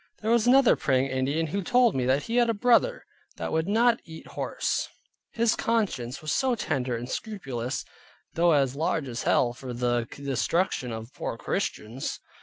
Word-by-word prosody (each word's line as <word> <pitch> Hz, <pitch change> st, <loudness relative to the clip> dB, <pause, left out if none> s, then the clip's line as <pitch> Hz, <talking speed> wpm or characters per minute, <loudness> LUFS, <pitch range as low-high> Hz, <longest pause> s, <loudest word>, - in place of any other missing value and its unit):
There 220 Hz, -, +1 dB
was 235 Hz, 0 st, +3 dB
another 265 Hz, 0 st, +6 dB
Praying 135 Hz, 0 st, +1 dB
Indian, 135 Hz, +5 st, 0 dB
who 195 Hz, +6 st, -2 dB
told 245 Hz, +1 st, +3 dB
me, 125 Hz, -2 st, -1 dB
that 135 Hz, +3 st, +2 dB
he 230 Hz, +1 st, -2 dB
had 240 Hz, -1 st, +4 dB
a 230 Hz, -, +1 dB
brother, 250 Hz, -, +3 dB, 0.3 s
that -, -, -4 dB
would 160 Hz, +1 st, 0 dB
not 230 Hz, +3 st, +3 dB
eat 160 Hz, -1 st, -11 dB
horse; -, -, -2 dB, 0.4 s
his 230 Hz, 0 st, +1 dB
conscience 170 Hz, -, -1 dB
was 155 Hz, -, -2 dB
so 260 Hz, -2 st, +2 dB
tender 125 Hz, -, -1 dB
and 120 Hz, +1 st, -6 dB
scrupulous 135 Hz, -, -4 dB, 0.5 s
(though 170 Hz, 0 st, +4 dB
as 135 Hz, -3 st, +2 dB
large 155 Hz, -1 st, -1 dB
as 120 Hz, -1 st, -4 dB
hell, 120 Hz, -2 st, +2 dB
for 125 Hz, 0 st, -7 dB
the 120 Hz, -1 st, 0 dB
destruction 140 Hz, 0 st, -1 dB
of 115 Hz, +3 st, -7 dB
poor -, -, -4 dB
Christians). 115 Hz, +5 st, -3 dB
155 Hz, 175 wpm, -27 LUFS, -, 0.5 s, another